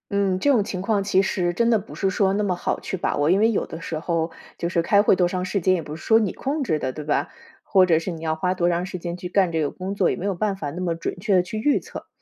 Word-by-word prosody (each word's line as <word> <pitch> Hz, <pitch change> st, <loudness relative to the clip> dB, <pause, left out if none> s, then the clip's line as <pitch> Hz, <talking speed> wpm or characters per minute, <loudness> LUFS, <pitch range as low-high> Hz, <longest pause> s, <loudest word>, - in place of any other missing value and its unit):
嗯， 195 Hz, -2 st, +1 dB
这 285 Hz, -, +3 dB
种 240 Hz, -6 st, +4 dB
情 190 Hz, -2 st, -4 dB
况 200 Hz, 0 st, 0 dB
其 190 Hz, -1 st, +3 dB
实 180 Hz, -2 st, 0 dB
真 230 Hz, +6 st, +2 dB
的 225 Hz, -2 st, +4 dB
不 200 Hz, -, -11 dB
是 195 Hz, -, 0 dB
说 190 Hz, 0 st, +1 dB
那 210 Hz, +1 st, 0 dB
么 195 Hz, -3 st, +1 dB
好 175 Hz, -, -2 dB
去 190 Hz, -, -4 dB
把 -, -, -1 dB
握， 145 Hz, +3 st, +2 dB
因 190 Hz, -, +4 dB
为 220 Hz, +2 st, +4 dB
有 215 Hz, -, 0 dB
时 165 Hz, -1 st, -4 dB
候 165 Hz, 0 st, -1 dB, 0.3 s
就 170 Hz, -, -2 dB
是 170 Hz, -1 st, +1 dB
开 200 Hz, +4 st, +4 dB
会 205 Hz, -, +4 dB
多 180 Hz, -, +2 dB
长 185 Hz, 0 st, -2 dB
时 195 Hz, +1 st, -1 dB
间， 185 Hz, +2 st, +3 dB
也 180 Hz, -, 0 dB
不 150 Hz, 0 st, -7 dB
是 155 Hz, -, -11 dB
说 225 Hz, 0 st, +5 dB
你 210 Hz, -5 st, -1 dB
控 285 Hz, +2 st, -2 dB
制 160 Hz, -, 0 dB
的， 130 Hz, -, -2 dB
对 150 Hz, +3 st, -8 dB
吧？ 150 Hz, -, 0 dB, 0.3 s
或 190 Hz, -2 st, +4 dB
者 170 Hz, -3 st, +3 dB
是 165 Hz, +3 st, -3 dB
你 165 Hz, -2 st, -7 dB
要 160 Hz, -1 st, -1 dB
花 180 Hz, +3 st, 0 dB
多 175 Hz, -2 st, 0 dB
长 175 Hz, +1 st, 0 dB
时 185 Hz, 0 st, -6 dB
间 170 Hz, 0 st, -4 dB
去 180 Hz, 0 st, -7 dB
干 185 Hz, -2 st, +2 dB
这 160 Hz, -, +1 dB
个 145 Hz, -, -1 dB
工 190 Hz, +2 st, -5 dB
作， 195 Hz, -3 st, +2 dB
也 -, -, -1 dB
没 185 Hz, -, -5 dB
有 200 Hz, -2 st, 0 dB
办 200 Hz, +2 st, -1 dB
法 150 Hz, -6 st, -4 dB
那 175 Hz, +5 st, -6 dB
么 170 Hz, -2 st, -1 dB
准 165 Hz, -, -4 dB
确 205 Hz, -1 st, +2 dB
地 -, -, +5 dB
去 190 Hz, +5 st, -6 dB
预 290 Hz, +6 st, +2 dB
测。 -, -, -10 dB
185 Hz, 345 characters per minute, -23 LUFS, 170-200 Hz, 0.3 s, 说